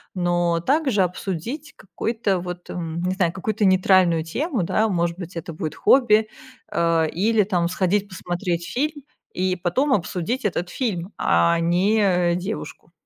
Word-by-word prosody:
но 175 -2 +1
также 265 - +2
обсудить 190 - -3
какой-то 200 -1 -2
вот, 180 0 -7
м, 165 -1 -4
не 185 +1 0
знаю, 180 -3 +1
какую-то 210 +3 -1
нейтральную 185 -3 +4
тему, 240 - -2
да. 215 +6 +1
Может 170 -3 -1
быть 175 -1 -8
это 165 0 -5
будет 155 -1 -5
хобби, 220 -5 +4 0.4
э, 165 -1 +2
или 210 +6 +2
там 180 -4 0
сходить 195 +3 0
посмотреть 175 -2 -3
фильм 290 +3 -2 0.3
и 185 0 0
потом 225 - +1
обсудить 190 +6 -2
этот 180 -3 -1
фильм, 195 -6 -3
а 170 0 +3
не, 180 +6 +2
э, 180 -4 +2
девушку. 180 -3 -6
185 Hz, 145 wpm, -23 LUFS, 170-215 Hz, 0.4 s, нейтральную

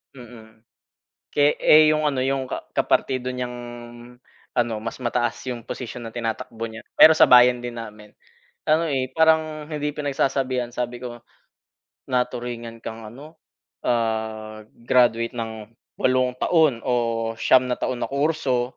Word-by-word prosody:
Mm. 110 -3 -14 0.7
Ke 145 0 +3
eh, 155 0 +6
yung 155 0 +1
ano, 135 -3 0
yung 135 0 -1
ka - - -5
kapartido 130 -1 0
niyang 125 -1 -4 1.0
ano, 120 -2 +1
mas 115 - -5
mataas 120 -1 -1
yung 120 -2 -6
posisyon 125 -1 -6
na 115 - -14
tinatakbo 115 -1 -4
niya, 110 0 -9 0.2
pero 160 - +10
sa - - +6
bayan 125 0 +7
din 120 -1 -6
namin. 105 -2 -10 0.6
Ano, 160 +2 +3
eh, 135 -4 -1
parang 160 -1 +2
hindi 150 -1 -2
pinagsasabihan. 135 -3 -1
Sabi 120 0 -4
ko, 120 -2 -8 0.9
"Naturingan 120 -2 -3
kang 110 -1 -7
ano, 145 +8 -13 0.5
ah, 110 -2 -2
graduate 115 -1 +2
ng 110 -1 -6 0.2
8 130 -1 +1
taon 150 -5 +2
o 115 -2 0
9 130 0 +5
na 125 - -1
taon 130 - -1
na - - -6
kurso, 140 -4 -1
125 Hz, 140 wpm, -23 LUFS, 115-135 Hz, 1.0 s, pero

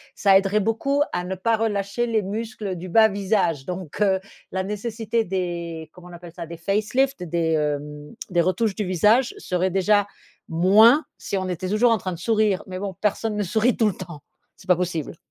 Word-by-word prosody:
ça 195 -2 +5
aiderait 200 +2 +1
beaucoup 275 +7 0
à 175 0 -2
ne 190 +1 -3
pas 225 +4 +1
relâcher 210 +1 -1
les 225 -2 +1
muscles 210 0 -4
du 180 +2 -7
bas 220 +4 +5
visage 190 -8 0
donc 180 -1 -6
heu, 190 -2 +3 0.3
la 190 - -1
nécessité 220 +2 -2
des 170 -4 -4
comment 180 0 -14
on 175 - -12
appelle 175 -1 -11
ça? 170 - -7
Des 170 +1 -8
facelift 215 +8 0
des, 165 -1 -1
hem, 150 -1 -3 0.2
des 175 -1 0
retouches 190 +4 0
du 210 - -2
visage 210 - +3
serait 180 - -1
déjà 205 +2 +2 0.4
moins 215 - +5
si 200 - -3
on 185 -1 -3
était 180 +1 -3
toujours 215 +4 +3
en 225 - +3
train 185 -2 -4
de 170 - -7
sourire 215 -2 +1
mais 185 0 -6
bon, 195 -1 -4
personne 210 +1 0
ne 210 - 0
sourit 220 +6 +1
tout 220 - +2
le 200 - 0
temps, 155 -5 -9 0.3
c'est - - -18
pas 180 -2 +4
possible. 165 -3 -3
195 Hz, 200 wpm, -23 LUFS, 175-220 Hz, 0.4 s, ça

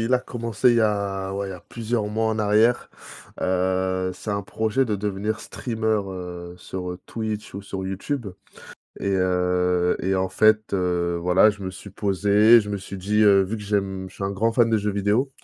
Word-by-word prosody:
il 115 +3 0
a - - +4
commencé 120 0 0
il 120 - +3
y - - +4
a, 100 -3 0
ouais, 100 0 -3
il - - -6
y - - -5
a 90 - -9
plusieurs 115 -2 -2
mois 110 +2 -1
en 110 0 -1
arrière. 110 +3 +2 0.5
Heu, 95 0 0
c'est 105 - -6
un 100 0 -1
projet 110 +6 0
de 105 -3 -1
devenir 105 +2 -2
streameur, 110 -4 -2
heu, 90 -1 -7
sur, 90 0 -6
heu, 90 - -6
Twitch 110 -3 -5
ou 100 - -6
sur 95 -1 -5
Youtube. 110 +7 -3 0.7
Et, - - -2
heu, 90 -1 +1
et 95 +1 0
en 95 0 0
fait, 110 +2 +3
heu, 90 -2 0
voilà, 90 +4 +5
je 105 -1 -9
me 95 - -3
suis 100 +2 -11
posé, 105 +4 +4
je 105 - -6
me 100 - -1
suis 100 0 -8
dit: 105 +3 0
«Heu, 100 -2 +6
vu 105 +4 -3
que 105 - -8
j'aime 95 -2 -2
je - - -18
suis 100 - -5
un 95 - -1
grand 110 +4 0
fan 115 -1 +3
de 110 - +3
jeux 105 0 -1
vidéo». 105 +7 +1
100 Hz, 215 wpm, -24 LUFS, 95-110 Hz, 0.7 s, Heu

